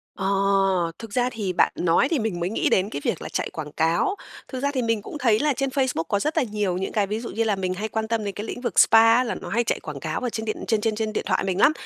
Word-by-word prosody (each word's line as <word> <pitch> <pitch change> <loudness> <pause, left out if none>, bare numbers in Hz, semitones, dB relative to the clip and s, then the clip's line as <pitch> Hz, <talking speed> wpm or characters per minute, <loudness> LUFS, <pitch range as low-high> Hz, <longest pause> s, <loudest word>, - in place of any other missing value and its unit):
Ờ, 195 - -2 0.7
thực 225 -3 -9
ra 245 +1 +2
thì 205 -6 -3
bạn 175 - +3
nói 175 +8 +3
thì 320 - +1
mình 215 -6 -2
mới 175 +2 -1
nghĩ 220 - 0
đến 190 +2 +2
cái 145 - -5
việc - - -1
là - - -6
chạy - - -2
quảng 150 -2 -7
cáo. 165 - +1 0.3
Thực 260 - -5
ra 285 - +1
thì 255 - 0
mình 230 -2 0
cũng 300 - -7
thấy 230 -6 +3
là 295 -1 +2
trên 275 +1 -1
Facebook 260 - 0
có 200 +5 -1
rất 305 +8 -2
là 310 - +4
nhiều 205 -5 -1
những 190 - -3
cái 205 -2 +1
ví 210 +2 -2
dụ 235 - -6
như 230 - -1
là 215 -3 +1
mình 185 -1 -2
hay 210 +4 -3
quan 220 0 -3
tâm 225 -1 -1
đến 200 - -3
cái 205 - -5
lĩnh 245 - -6
vực 240 -7 +1
spa 225 0 +7
á 250 - +3
là 235 - -3
nó - - -7
hay 235 - +1
chạy 225 - -1
quảng 150 -3 -7
cáo 155 +3 -3
ở 250 - -2
trên 220 -1 -4
điện 215 - -2
trên 220 -3 +1
trên 220 0 0
trên 215 0 -2
điện - - -1
thoại - - +1
mình 190 0 -1
lắm, 295 - +6
220 Hz, 315 wpm, -24 LUFS, 190-240 Hz, 0.7 s, spa